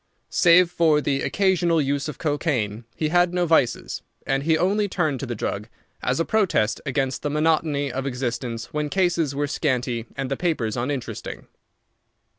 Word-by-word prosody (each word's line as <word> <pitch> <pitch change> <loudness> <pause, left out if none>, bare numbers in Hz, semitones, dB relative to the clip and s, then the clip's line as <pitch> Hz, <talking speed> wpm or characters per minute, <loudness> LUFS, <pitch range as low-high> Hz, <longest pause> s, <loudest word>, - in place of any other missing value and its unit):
Save 175 0 +5
for 160 -4 +3
the 140 -2 0
occasional 180 -4 +2
use 140 0 0
of 150 - -6
cocaine, 130 -8 -1
he 155 - -1
had 175 +1 +3
no 180 -1 +2
vices, 155 -8 +1 0.2
and 135 0 +1
he 160 +2 +2
only 205 +5 +1
turned 155 -8 0
to 135 - -4
the 120 - -3
drug 105 0 -3 0.3
as 125 +1 0
a 165 - +1
protest 190 - +1
against 135 -1 -1
the 145 - -1
monotony 150 -2 +1
of 135 +2 -3
existence 125 -1 -4
when 150 -1 -1
cases 170 -5 +1
were 145 +1 0
scanty 125 -5 -1
and 135 0 -3
the - - +1
papers 155 -11 -1
uninteresting. 125 +1 -4
145 Hz, 165 wpm, -24 LUFS, 130-165 Hz, 0.3 s, Save